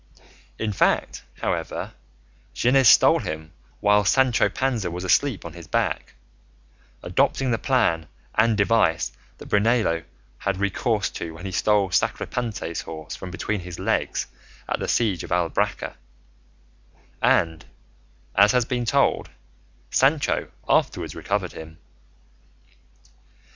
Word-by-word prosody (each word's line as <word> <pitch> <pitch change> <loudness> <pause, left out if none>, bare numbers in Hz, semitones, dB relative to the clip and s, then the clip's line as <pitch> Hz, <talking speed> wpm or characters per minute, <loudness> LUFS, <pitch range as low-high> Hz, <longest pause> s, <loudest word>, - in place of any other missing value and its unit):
In 105 -2 -2
fact, - - +1 0.2
however, - - -3 0.6
Gines 130 +1 +4
stole - - +7
him 80 0 -6 0.3
while 105 0 +4
Sancho 130 +5 +3
Panza 120 -8 -1
was 90 +2 -5
asleep 100 +4 +1
on 85 - -7
his 85 -2 -11
back, - - -1 0.9
adopting 130 -2 +1
the 115 - 0
plan 85 - +1 0.3
and 110 0 +3
device 100 -6 +2 0.3
that - - -11
Brunello 105 -5 +2 0.4
had 100 -1 -1
recourse 100 +2 0
to 80 -1 -6
when 85 +4 -10
he 95 - -4
stole 100 0 +2
Sacripante's 105 -4 -2
horse 80 -2 -8
from 95 - -8
between 100 +3 -3
his 90 -1 -8
legs - - -1 0.4
at - - -2
the - - -3
siege 105 -7 +1
of - - -8
Albracca; 90 +3 0 1.3
and, 80 -2 +2 0.7
as 100 +2 +5
has 125 -2 +3
been 125 -1 -2
told, 110 - +2 0.6
Sancho 140 +2 +2 0.2
afterwards - - +1
recovered - - -2
him. 80 0 -10
100 Hz, 120 wpm, -24 LUFS, 85-115 Hz, 1.3 s, stole